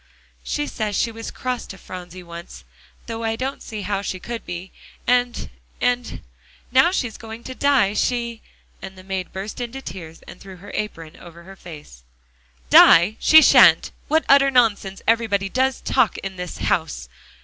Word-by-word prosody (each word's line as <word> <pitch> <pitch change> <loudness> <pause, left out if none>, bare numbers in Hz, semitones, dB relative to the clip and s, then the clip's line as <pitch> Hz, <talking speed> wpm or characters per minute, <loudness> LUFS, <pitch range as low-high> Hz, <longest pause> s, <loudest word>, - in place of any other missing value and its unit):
"She 295 - -2
says 215 -7 -3
she 230 - 0
was 225 0 -7
cross 255 -1 -4
to 195 - -10
Phronsie 180 -1 -10
once 170 0 -11 0.4
though 230 -1 -6
I 225 0 -1
don't 265 +4 -4
see 215 -3 -7
how 200 +1 -2
she 185 -2 -5
could 235 +4 -6
be, 175 +2 -7 0.3
and 245 0 +1 0.3
and 245 -1 -1 0.5
now 260 +2 +6
that 360 - +1
she's 245 - -3
going 225 +1 -10
to 260 - -7
die, 260 -7 +2
she" 235 0 -1 0.4
and 190 -1 -9
the 185 - -12
maid 190 -1 -4
burst 200 +5 -6
into 245 +2 -5
tears 165 -8 -10
and - - -13
threw 195 -1 -11
her 195 +3 -12
apron 165 -6 -5
over 170 -1 -14
her 195 +2 -13
face. 150 - -12 0.7
"Die 175 +6 +7
she 315 0 +7
shan't! 175 -9 +6 0.2
What 315 +2 +1
utter 275 0 +6
nonsense 215 -6 +1
everybody 220 -4 +1
does 260 +3 0
talk 250 -8 +1
in 195 -1 -6
this 180 -1 -7
house!" - - -2
210 Hz, 170 wpm, -21 LUFS, 185-245 Hz, 0.7 s, Die